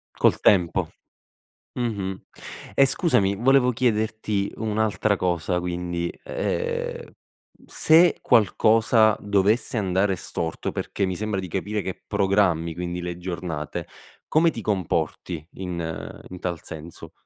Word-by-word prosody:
Col - - +3
tempo. 90 -4 +3 0.8
Mh-mh. 100 -6 -3 0.5
E 140 - +6
scusami 130 - +2
volevo 125 +3 +4
chiederti 110 -4 0
un'altra 110 -2 0
cosa; 90 0 0
quindi, 85 -1 -3
ehm, 480 -1 -2 0.6
se 165 +2 +4
qualcosa 110 -1 +4
dovesse 105 +4 +1
andare 95 -1 +1
storto, 80 -2 -4
perché 100 - -2
mi 95 - -2
sembra 105 -2 -2
di 95 - -6
capire 100 +3 -2
che 95 - -6
programmi, 95 -4 +2
quindi, 90 +1 -4
le 85 0 -4
giornate, 85 -4 -5 0.4
come 165 +2 +4
ti 115 - -6
comporti 90 -4 -2
in 85 -4 -5
in 90 - -8
tal 85 -3 -3
senso? 80 +1 -9
100 Hz, 115 wpm, -24 LUFS, 90-110 Hz, 0.8 s, E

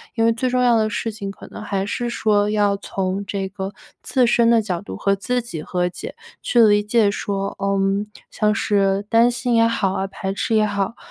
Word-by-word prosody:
因 225 - +1
为 230 - +4
最 250 +2 -1
重 250 0 +1
要 240 -2 +4
的 215 -1 +1
事 220 +2 -3
情 205 -2 -6
可 195 - -10
能 - - -9
还 195 -2 -2
是 240 +3 -3
说 210 -3 +1
要 205 -1 +2
从 195 0 -3
这 195 -1 -3
个 195 0 -6 0.3
自 255 -2 +2
身 235 0 +3
的 230 -1 +5
角 180 -5 -3
度 205 - -8
和 200 - +1
自 245 +5 -1
己 175 -10 -7
和 180 +2 -1
解， - - -8 0.3
去 240 - +3
理 205 -1 +4
解 210 -1 +2
说， 200 -1 -3
嗯， 195 +1 0 0.2
像 210 -1 +1
是 200 -2 +1
担 230 +1 +5
心 245 0 -1
也 230 0 +5
好 215 -4 0
啊， 195 - -2
排 195 0 -5
斥 225 - -1
也 215 -1 +4
好， 200 +2 -2
205 Hz, 230 characters per minute, -21 LUFS, 195-230 Hz, 0.3 s, 的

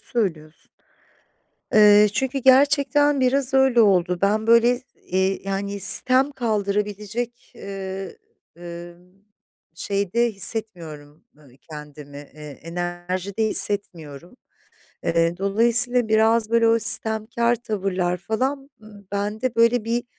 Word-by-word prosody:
söylüyorsun. 165 -9 -5 1.1
Eee, 210 0 +6
çünkü 265 +4 -3
gerçekten 280 +2 +2
biraz 265 +1 -1
öyle 265 -3 +3
oldu. 180 -4 +1
Ben, 215 +2 0
böyle, 235 +2 +3 0.3
iii, 190 +1 -1
yani, 200 +1 -5
sitem 255 +8 +4
kaldırabilecek, 210 0 -4
ııı, 195 -1 -8 0.4
ımm, 175 +2 -13 0.5
şeyde 200 +6 -2
hissetmiyorum, 170 -8 -2
ııı, 150 -2 -21 0.2
kendimi, 150 -1 -12 0.2
eee, 150 -2 -12
enerjide 175 +4 -5
hissetmiyorum. 175 - +1 0.7
Eee, 165 +1 0
dolayısıyla 235 +4 +2
biraz 220 0 +1
böyle 230 0 +2
o 230 - +2
sitemkâr 230 +1 0
tavırlar, 190 -5 -3
falan 265 +8 -4 0.4
bende 210 +5 -3
böyle 230 0 +2
bir, 235 +1 -3
210 Hz, 100 wpm, -21 LUFS, 180-235 Hz, 1.1 s, Eee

